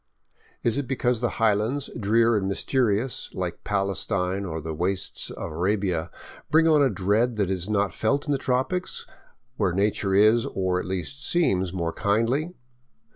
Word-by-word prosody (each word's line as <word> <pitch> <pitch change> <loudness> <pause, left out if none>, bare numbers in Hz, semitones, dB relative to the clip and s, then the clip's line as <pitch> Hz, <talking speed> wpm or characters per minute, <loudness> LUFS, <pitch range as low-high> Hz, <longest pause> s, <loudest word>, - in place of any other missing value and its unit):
Is 120 +3 +1
it 140 - -4
because 125 -2 0
the 120 - -1
highlands, 115 +5 +1
drear 115 +1 +3
and 100 -2 0
mysterious, 120 +3 0
like 90 -2 -4
Palestine 100 -1 -1
or 80 -3 -4
the 80 +1 -5
wastes 90 +4 -2
of - - -6
Arabia, 90 -1 -1 0.4
bring 160 +1 +4
on 155 -2 +5
a 135 - +4
dread 110 +4 +1
that 100 -3 0
is 95 +1 -3
not 100 -2 +1
felt 140 +6 0
in 145 - -2
the 140 - +1
tropics, 130 +10 -1 0.5
where 95 -5 +1
nature 100 0 +1
is, 110 +3 +5
or 95 -1 -1
at - - -5
least 95 +10 -4
seems, 95 - +1
more 85 -3 -2
kindly? 120 - 0
105 Hz, 160 wpm, -25 LUFS, 95-125 Hz, 0.5 s, on